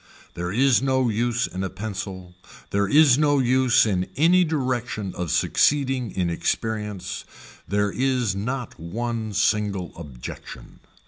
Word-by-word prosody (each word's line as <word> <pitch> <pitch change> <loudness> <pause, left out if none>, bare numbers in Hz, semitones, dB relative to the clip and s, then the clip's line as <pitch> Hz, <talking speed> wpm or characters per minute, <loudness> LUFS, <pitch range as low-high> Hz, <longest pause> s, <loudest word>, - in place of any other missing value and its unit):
There 90 +1 -4
is 130 +4 +3
no 130 -2 +1
use 120 +3 0
in 95 +1 -5
a 95 - -2
pencil, 95 -3 -6 0.4
there 100 0 +1
is 145 -1 +6
no 145 -1 +3
use 130 -2 +4
in 95 -4 -1
any 175 +5 +5
direction 125 - -2
of 90 -2 -4
succeeding 135 - +2
in 90 -2 -1
experience, 105 +3 -3 0.4
there 105 0 +1
is 125 -5 0
not 120 +2 -4
one 110 +6 -3
single 105 -3 0
objection. 70 -7 -10
110 Hz, 130 wpm, -24 LUFS, 95-130 Hz, 0.4 s, is